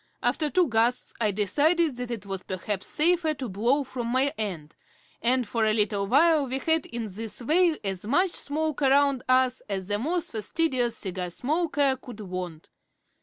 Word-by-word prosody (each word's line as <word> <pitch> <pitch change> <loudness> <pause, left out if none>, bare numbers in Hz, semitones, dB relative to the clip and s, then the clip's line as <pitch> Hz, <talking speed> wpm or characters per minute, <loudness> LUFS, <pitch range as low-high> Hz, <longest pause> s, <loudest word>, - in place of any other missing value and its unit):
After 305 -2 +1
two 360 +2 +3
gusts 235 +1 +1
I 215 - +3
decided 290 - +2
that 245 -1 -4
it 225 -4 -5
was 195 -1 -4
perhaps 190 +2 -4
safer 320 0 +2
to 265 -3 -5
blow 235 +8 +1
from 250 -3 -5
my 260 +4 +1
end, 175 - -5 0.5
and 250 0 +2
for 225 +1 0
a 215 0 +2
little 205 -2 0
while 295 +4 +4
we 260 +1 -2
had 320 +2 +1
in 235 -1 -4
this 220 +2 -4
way 320 +6 +3
as 195 -2 -3
much 360 - +2
smoke 310 -1 -3
around 275 -1 +3
us 255 0 +3
as 190 -1 -3
the 205 0 0
most 330 +8 -2
fastidious 240 - 0
cigar 185 -2 -4
smoker 285 - 0
could 245 -4 -10
want. 180 -4 -6
250 Hz, 170 wpm, -26 LUFS, 210-295 Hz, 0.5 s, while